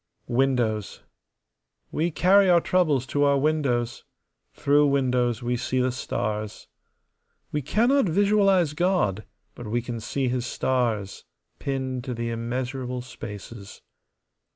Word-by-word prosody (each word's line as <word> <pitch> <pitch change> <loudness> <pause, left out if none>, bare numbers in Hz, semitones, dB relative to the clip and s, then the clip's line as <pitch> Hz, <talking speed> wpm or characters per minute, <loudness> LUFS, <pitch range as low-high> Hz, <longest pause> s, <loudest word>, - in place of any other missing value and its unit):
Windows. 120 -5 0 0.9
We 165 +3 0
carry 190 +4 +4
our 175 -1 +6
troubles 155 -8 +1
to 145 +2 0
our 140 -1 +4
windows; 135 -5 0 0.5
through 145 +1 +3
windows 125 -4 +1
we 120 +1 0
see 130 +2 -1
the 125 0 +1
stars. 110 -4 -4 0.8
We 150 - -1
cannot 235 - +2
visualize 195 -3 +3
God, 165 - 0 0.3
but 120 - -9
we 120 +3 0
can 120 -1 -5
see 130 +4 -2
His 125 0 -1
stars 115 -7 -1 0.4
pinned 130 -2 -3
to 125 -3 -4
the 115 0 -3
immeasurable 125 +2 -3
spaces. 105 -3 -10
130 Hz, 120 wpm, -25 LUFS, 120-150 Hz, 0.9 s, our